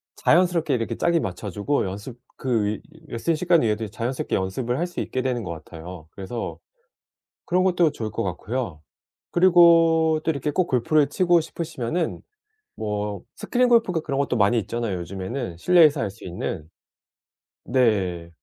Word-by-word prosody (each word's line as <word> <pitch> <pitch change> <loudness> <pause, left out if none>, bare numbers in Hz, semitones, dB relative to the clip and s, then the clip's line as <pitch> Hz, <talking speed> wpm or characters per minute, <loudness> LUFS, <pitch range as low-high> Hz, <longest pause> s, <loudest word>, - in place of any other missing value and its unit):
자연스럽게 170 -4 +3
이렇게 115 -2 -1
짝이 170 -1 +2
맞춰지고 100 - -2
연습 105 +6 -6 0.2
그 120 -5 0
위 105 +1 -2 0.3
레슨 155 +8 -1
시간 170 0 +3
외에도 110 0 0
자연스럽게 120 +5 -3
연습을 115 +7 -2
할 175 - 0
수 175 - -5
있게 130 - -2
되는 125 -3 -1
것 85 - -5
같아요. 80 +1 -9
그래서 105 +5 -5 0.9
그런 180 +1 +2
것도 175 -4 +3
좋을 110 -6 -5
것 105 - -2
같고요. 95 - -4 0.5
그리고 165 -3 +5
또 165 - +2
이렇게 145 +1 -2
꼭 185 +3 +1
골프를 140 +4 +2
치고 175 -2 +3
싶으시면은 160 -1 -3 0.6
뭐 105 -2 -3
스크린 250 0 +1
골프인가 210 -8 +3
그런 140 -3 -2
것도 135 -3 0
많이 105 +2 +3
있잖아요, 110 -2 -2
요즘에는 95 +3 -5
실내에서 155 - +5
할 105 - -1
수 100 - -15
있는. 85 -2 -5 1.0
네. 95 -9 +1
125 Hz, 340 characters per minute, -24 LUFS, 100-165 Hz, 1.0 s, 그리고